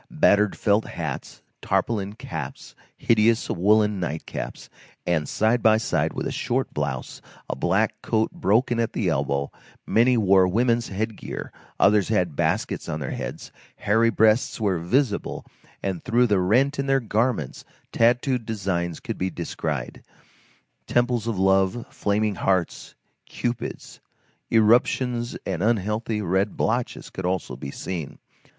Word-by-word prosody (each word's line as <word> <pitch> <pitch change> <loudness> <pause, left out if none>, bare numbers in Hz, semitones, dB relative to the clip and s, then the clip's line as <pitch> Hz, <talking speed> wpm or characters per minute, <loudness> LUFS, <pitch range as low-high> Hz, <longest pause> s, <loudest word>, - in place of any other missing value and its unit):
Battered 105 0 +3
felt 105 +1 +2
hats, - - -6 0.2
tarpaulin 105 -3 -1
caps, 80 - -7 0.2
hideous 115 0 +3
woollen 105 +2 +3
nightcaps, 80 -3 -5 0.4
and, 80 -4 0
side 115 +3 +2
by 110 -1 +5
side 110 - 0
with - - -4
a - - -2
short - - -2
blouse, - - -4 0.3
a - - -3
black - - 0
coat 110 -1 0
broken 120 - +1
at 115 - 0
the - - 0
elbow; 70 0 -1 0.3
many 120 +2 +3
wore 95 -3 +5
women's 115 +4 +1
headgear, 110 +3 -5 0.3
others 100 -1 +4
had 90 -8 +1
baskets - - -1
on 75 - -3
their 70 - -4
heads; - - -6 0.2
hairy 115 +3 +2
breasts 110 +2 +2
were 100 -5 +1
visible, 105 - 0 0.4
and 95 -4 -3
through 120 +2 +3
the 105 -5 +2
rent 130 +10 +2
in 140 - -1
their 135 0 +3
garments 110 - -1 0.3
tattooed 120 +2 +2
designs 95 -6 -2
could - - -6
be 95 - 0
descried; 80 -7 -4 0.9
temples 120 -2 +1
of 115 -4 -1
Love, 95 +4 +2
flaming 105 +1 0
hearts, 95 -2 -1 0.3
Cupids; 120 0 -4 0.5
eruptions 120 +2 +2
and 85 - -2
unhealthy 105 0 0
red 95 +3 0
blotches - - -1
could 95 -1 -4
also 90 -8 -2
be 65 +2 -7
seen. 85 +1 -5
105 Hz, 135 wpm, -24 LUFS, 95-115 Hz, 0.9 s, by